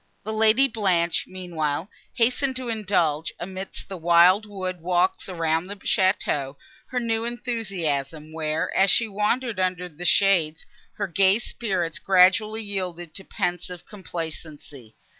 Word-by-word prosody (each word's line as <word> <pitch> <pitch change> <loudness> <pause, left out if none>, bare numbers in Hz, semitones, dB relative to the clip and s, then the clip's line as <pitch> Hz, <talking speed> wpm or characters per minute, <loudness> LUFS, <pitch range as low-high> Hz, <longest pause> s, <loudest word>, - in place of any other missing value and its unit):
The 220 - -4
Lady 220 +5 +4
Blanche, 185 -8 +1
meanwhile, 170 -3 -3 0.3
hastened 255 +3 +2
to 255 -2 -4
indulge, 180 -8 0
amidst 190 +2 -6
the 190 - -6
wild 175 +5 +5
wood 185 -3 -5
walks 180 +2 +1
around 165 -1 0
the 205 - -6
château, 185 -9 0 0.3
her 250 - -2
new 225 -1 -1
enthusiasm, 175 - -3
where, 155 -1 -2
as 195 +1 +4
she 230 +4 +3
wandered 210 +2 -1
under 180 -1 -1
the 175 0 -11
shades, 175 -6 +3 0.3
her 205 - -2
gay 190 +2 +3
spirits 190 -8 -3
gradually 195 +4 +4
yielded 180 -5 -4
to 195 - -7
pensive 180 -1 -3
complacency. 155 - -8
185 Hz, 130 wpm, -24 LUFS, 165-210 Hz, 0.3 s, wild